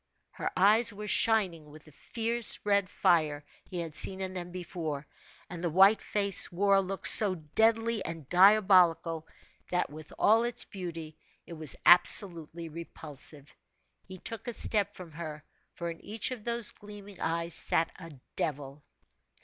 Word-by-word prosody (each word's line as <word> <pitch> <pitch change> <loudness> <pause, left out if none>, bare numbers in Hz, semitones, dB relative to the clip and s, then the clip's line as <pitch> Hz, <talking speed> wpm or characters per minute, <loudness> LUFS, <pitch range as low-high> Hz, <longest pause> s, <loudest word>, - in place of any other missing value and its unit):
Her - - -4
eyes 215 +5 +4
were 210 +1 -9
shining 185 -10 +1
with 150 +1 -14
the 155 - -17
fierce 230 +8 +1
red 200 -2 +1
fire 155 -6 0 0.2
he 180 -2 -6
had 165 -2 -7
seen 190 +4 +2
in 190 -1 -5
them 180 -1 -7
before, 170 -5 -6 0.4
and 175 -1 -9
the 175 - 0
white 195 +5 +4
face 200 -2 +1
wore 200 +3 +1
a 195 - +4
look 195 0 -6
so 200 -4 +6
deadly 225 +7 0
and 165 -4 -8
diabolical 180 -4 +3 0.4
that, 180 -4 -2
with 155 0 -12
all 225 +2 +3
its 240 0 +1
beauty, 165 -5 -8 0.3
it - - -11
was 155 -2 +1
absolutely 170 -2 +4
repulsive. 150 -3 -8 0.5
He 185 0 -11
took 230 +5 -7
a 240 - -3
step 205 -2 0
from 180 -3 -11
her 155 -2 -8 0.3
for 170 -1 -5
in 165 - -12
each 220 +4 -3
of 245 -4 -7
those 235 -2 +1
gleaming 205 -1 -13
eyes 170 +1 -2
sat 165 - +1
a 165 -2 -10 0.3
devil. 145 -1 -4
180 Hz, 155 wpm, -29 LUFS, 160-205 Hz, 0.5 s, so